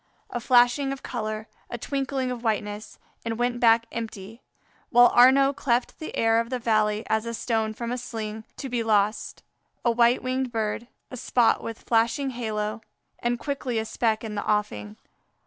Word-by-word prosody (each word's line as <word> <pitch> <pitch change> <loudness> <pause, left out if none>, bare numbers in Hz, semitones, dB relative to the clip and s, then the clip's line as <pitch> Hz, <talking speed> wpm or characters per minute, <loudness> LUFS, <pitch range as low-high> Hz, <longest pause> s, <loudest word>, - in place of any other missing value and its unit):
a 240 - -2
flashing 245 +3 +4
of 275 - -6
color, 215 -2 -4 0.2
a 240 - -4
twinkling 270 0 -2
of 245 -1 -6
whiteness 210 -2 -2 0.3
and 230 -1 -3
went 245 0 0
back 230 -1 +5
empty. 225 0 -7 0.5
While 245 0 +7
Arnaux 270 +3 +6
cleft 250 -3 -1
the 315 - -6
air 225 0 +3
of 230 0 -2
the 255 - -1
valley 215 -2 +1
as 220 +1 0
a 230 - -3
stone 220 -2 -1
from 235 +1 -4
a 250 - -2
sling, 220 -2 -5
to 275 - -5
be 245 -2 -1
lost 210 -1 0 0.4
a 235 - +4
white 235 +1 +3
winged 255 0 -1
bird 225 0 -2 0.2
a 255 - -6
spot 240 -1 +2
with 230 -1 -7
flashing 235 +4 +1
halo 215 -2 -3 0.4
and, 240 0 0
quickly, 265 -3 -3
a 220 - -1
speck 220 0 0
in 220 -2 -5
the 205 - -3
offing. 105 - -2
230 Hz, 175 wpm, -25 LUFS, 220-245 Hz, 0.5 s, While